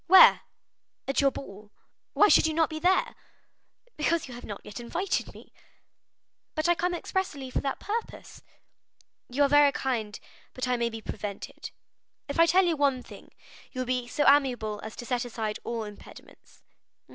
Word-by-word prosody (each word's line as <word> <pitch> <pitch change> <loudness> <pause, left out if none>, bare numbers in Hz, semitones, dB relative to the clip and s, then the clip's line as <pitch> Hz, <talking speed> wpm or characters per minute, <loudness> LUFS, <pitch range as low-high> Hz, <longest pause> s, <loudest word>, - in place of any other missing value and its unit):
"Where?" 375 +2 +8 0.7
"At 275 - +1
your 275 - +5
ball." 210 -6 -10 0.4
"Why 415 - +6
should 320 - +5
you 315 - -2
not 320 -1 +2
be 315 - -4
there?" 365 +3 +2 0.8
"Because 315 +1 0
you 250 - -9
have 240 - -10
not 205 -1 -7
yet 210 +3 -8
invited 355 +11 -2
me." - - -16 1.0
"But 310 +1 0
I 345 - +5
come 355 +1 -1
expressly 310 -8 -3
for - - -1
that 275 - -3
purpose." 450 +2 -5 0.9
"You 270 +4 +2
are - - +5
very 290 0 +6
kind, 230 -7 -3 0.4
but 255 0 -3
I 250 - +2
may 235 -1 0
be 225 -1 -8
prevented." 205 -2 -6 0.6
"If 285 +2 -4
I 335 - +7
tell 365 +3 +4
you 340 -2 +1
one 275 -3 +1
thing, - - -14 0.4
you 255 - -3
will - - -2
be 250 -1 -1
so 290 +4 0
amiable 250 -7 +3
as 220 - -7
to 240 - -8
set 245 0 -1
aside 220 -3 -4
all 230 -1 -3
impediments." 210 -1 -14
270 Hz, 175 wpm, -28 LUFS, 235-320 Hz, 1.0 s, Where